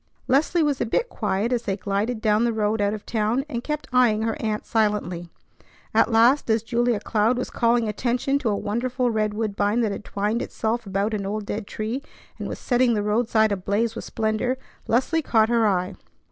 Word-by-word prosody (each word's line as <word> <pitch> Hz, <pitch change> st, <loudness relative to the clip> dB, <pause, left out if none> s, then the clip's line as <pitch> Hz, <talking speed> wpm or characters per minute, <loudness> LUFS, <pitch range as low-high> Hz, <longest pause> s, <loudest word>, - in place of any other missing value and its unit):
Leslie 310 Hz, +5 st, +3 dB
was 290 Hz, -3 st, 0 dB
a -, -, +2 dB
bit 485 Hz, -, 0 dB
quiet 210 Hz, +3 st, -1 dB
as 240 Hz, -, 0 dB
they 200 Hz, -4 st, -2 dB
glided 210 Hz, +4 st, -2 dB
down 215 Hz, 0 st, +3 dB
the 235 Hz, -, +2 dB
road 215 Hz, -1 st, 0 dB
out 200 Hz, 0 st, +2 dB
of 210 Hz, -, -10 dB
town, 225 Hz, +4 st, 0 dB
and 240 Hz, -5 st, -4 dB
kept 300 Hz, +1 st, -3 dB
eyeing 230 Hz, -4 st, +4 dB
her 225 Hz, 0 st, 0 dB
aunt 215 Hz, -1 st, -2 dB
silently. 205 Hz, -6 st, 0 dB, 0.6 s
At -, -, +3 dB
last, 235 Hz, +5 st, +4 dB
as 220 Hz, 0 st, +2 dB
Julia 235 Hz, -1 st, +1 dB
Cloud 220 Hz, +4 st, +1 dB
was 250 Hz, -, -3 dB
calling 235 Hz, -1 st, +2 dB
attention 245 Hz, +5 st, 0 dB
to 245 Hz, -, -1 dB
a 205 Hz, -, +1 dB
wonderful 245 Hz, +4 st, -1 dB
red 215 Hz, -1 st, 0 dB
woodbine 210 Hz, +1 st, 0 dB
that 220 Hz, -3 st, +1 dB
had 200 Hz, -, -5 dB
twined 210 Hz, +4 st, -1 dB
itself 225 Hz, 0 st, -2 dB
about 200 Hz, +3 st, -1 dB
an 200 Hz, -2 st, -2 dB
old 210 Hz, +1 st, -3 dB
dead 205 Hz, 0 st, -4 dB
tree 220 Hz, +5 st, -3 dB, 0.4 s
and -, -, -4 dB
was -, -, -5 dB
setting 245 Hz, -2 st, +2 dB
the 205 Hz, -, 0 dB
roadside 220 Hz, 0 st, +2 dB
ablaze 205 Hz, +4 st, 0 dB
with 230 Hz, -, -6 dB
splendor, 220 Hz, +3 st, -1 dB, 0.3 s
Leslie 265 Hz, +8 st, +2 dB
caught 225 Hz, -6 st, +3 dB
her 230 Hz, -2 st, +3 dB
eye. 185 Hz, -2 st, 0 dB
220 Hz, 200 wpm, -24 LUFS, 210-240 Hz, 0.6 s, eyeing